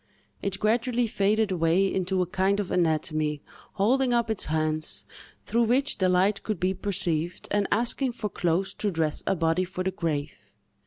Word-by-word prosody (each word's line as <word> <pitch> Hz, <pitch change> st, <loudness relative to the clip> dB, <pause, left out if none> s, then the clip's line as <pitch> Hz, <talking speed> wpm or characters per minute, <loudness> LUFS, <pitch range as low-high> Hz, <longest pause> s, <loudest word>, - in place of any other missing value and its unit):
It 195 Hz, -1 st, -2 dB
gradually 235 Hz, +3 st, +1 dB
faded 210 Hz, 0 st, +1 dB
away 170 Hz, +2 st, +2 dB
into 190 Hz, -1 st, 0 dB
a -, -, -3 dB
kind 190 Hz, +3 st, 0 dB
of 200 Hz, -, -3 dB
anatomy, 155 Hz, -3 st, 0 dB, 0.3 s
holding 245 Hz, +5 st, +2 dB
up 235 Hz, -2 st, +1 dB
its 220 Hz, -, 0 dB
hands, 155 Hz, 0 st, -2 dB, 0.4 s
through 235 Hz, +1 st, +2 dB
which 260 Hz, +3 st, +1 dB
the 185 Hz, -1 st, +3 dB
light 190 Hz, +3 st, +2 dB
could 215 Hz, -5 st, -3 dB
be 185 Hz, +1 st, +1 dB
perceived, 175 Hz, -3 st, -1 dB
and 205 Hz, -1 st, +1 dB
asking 240 Hz, +3 st, +2 dB
for 225 Hz, -3 st, -3 dB
clothes 175 Hz, 0 st, -1 dB
to 210 Hz, -, +1 dB
dress 160 Hz, -4 st, -1 dB
a 195 Hz, -, +2 dB
body 165 Hz, +1 st, +1 dB
for 185 Hz, 0 st, -4 dB
the 190 Hz, -, -1 dB
grave. 155 Hz, -5 st, -3 dB
190 Hz, 170 wpm, -26 LUFS, 165-215 Hz, 0.4 s, the